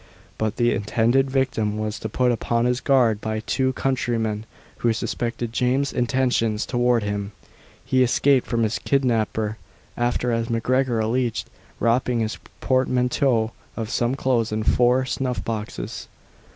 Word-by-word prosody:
But 110 0 -1
the 120 -1 +2
intended 120 +6 +2
victim 125 -6 0
was 110 0 -3
put 125 +3 0
upon 120 0 0
his 125 +1 +1
guard 120 -6 +3
by 110 0 -2
two 130 +4 0
countrymen, 115 -5 -1 0.3
who 115 -1 +1
suspected 115 +1 -3
James's 130 +3 +1
intentions 120 -4 +1
towards 120 -3 +1
him. 100 0 -3 0.5
He 130 - +2
escaped 130 +1 +3
from 115 -2 0
his 110 0 0
kidnapper, 110 -5 0 0.4
after, 120 0 0
as 115 0 -1
MacGregor 120 +1 +1
alleged, 115 +1 -1 0.3
robbing 120 0 +1
his 110 -2 -3 0.2
portmanteau 125 -2 +1 0.3
of 110 -1 -3
some 120 +2 +1
clothes 120 -5 0
and 110 0 -2
four 125 +3 +3
snuff 125 -5 -2
boxes. 105 - -5
120 Hz, 135 wpm, -23 LUFS, 110-130 Hz, 0.5 s, guard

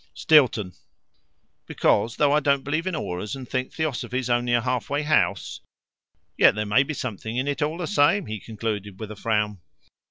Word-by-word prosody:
"Stilton. 125 - +3 0.9
Because, 115 +1 +1
though 145 -1 +3
I 150 - +4
don't 140 -2 +1
believe 155 +5 -2
in 185 - -1
auras, 105 -6 -4
and 130 -2 -8
think 130 +1 -3
Theosophy's 130 -5 -2
only 120 0 +1
a 120 - +2
halfway 130 +4 -1
house 150 - 0 0.2
" - - -67
" - - -47
Yet - - +6
there 105 0 -2
may 105 +5 +4
be 145 +2 -3
something 115 -2 -5
in 130 +2 -1
it 145 0 -2
all 155 +3 -1
the 175 - -3
same," 185 +2 +2
he 110 0 -5
concluded, 105 -3 -5
with 110 -1 -6
a - - -7
frown. 105 -3 -1
125 Hz, 190 wpm, -24 LUFS, 105-145 Hz, 0.9 s, Yet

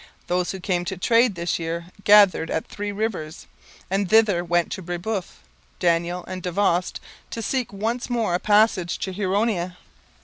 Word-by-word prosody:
Those 180 0 0
who 190 - -4
came 180 -1 -1
to 190 +2 -4
trade 230 +3 +3
this 170 0 -2
year 170 +1 -4
gathered 200 -5 +6
at 160 - -2
Three 205 0 -5
Rivers; 200 -7 -4 0.4
and 195 0 -1
thither 215 -5 +4
went 175 0 0
Brebeuf, 175 +3 -4 0.4
Daniel, 175 0 0
and 185 0 -6
Davost 180 0 0 0.3
to 230 - -5
seek 250 0 -1
once 225 +6 -3
more 230 -7 0
a 175 - +1
passage 205 -4 +3
to 190 - -4
Huronia. 190 -2 -1
185 Hz, 150 wpm, -23 LUFS, 175-210 Hz, 0.4 s, gathered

